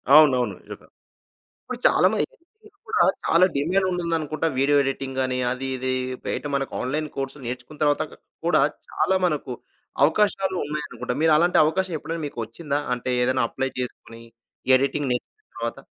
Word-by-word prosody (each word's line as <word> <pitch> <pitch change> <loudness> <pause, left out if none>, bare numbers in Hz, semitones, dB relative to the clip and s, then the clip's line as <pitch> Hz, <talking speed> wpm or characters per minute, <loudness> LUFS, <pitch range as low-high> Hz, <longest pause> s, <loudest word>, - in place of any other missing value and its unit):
అవునవును. 130 -9 +5
నిజంగా! - - -11 0.8
ఇప్పుడు 250 -1 -6
చాలామంది - - +3 0.4
దీనికి 425 -1 -20
కూడా - - +3 0.2
చాలా 170 +2 +6
డిమాండ్ 180 +7 +1
ఉండుందనుకుంటా. 165 -3 -1
వీడియో 145 +2 +4
ఎడిటింగ్ 135 -1 -3
అని 130 0 -2
అది 130 +1 -3
ఇది 130 0 -1 0.3
బయట - - -2
మనకు 135 -1 -2
ఆన్‌లైన్ 150 +4 -2
కోర్స్ 135 +1 -3
నేర్చుకున్న 125 +5 -7
తర్వాత 145 -1 +3 0.4
కూడా 160 -4 +4 0.3
చాలా 190 - +1
మనకు 150 -6 -1 0.5
అవకాశాలు 190 +2 +2
ఉన్నాయనుకుంటా. 150 +1 -4
మీరలాంటి 160 +2 +4
అవకాశం 180 +4 0
ఎప్పుడైనా 165 +1 -5
మీకొచ్చిందా? 140 +3 -4 0.2
అంటే, 125 +1 -4
ఏదైనా 130 +1 +2
అప్లై 135 +3 -2
చేసుకొని 115 -2 -6 0.5
ఎడిటింగ్ 140 +1 0
నేర్చుకున్న 430 - -5
తర్వాత? - - -4
145 Hz, 135 wpm, -24 LUFS, 130-165 Hz, 0.8 s, చాలా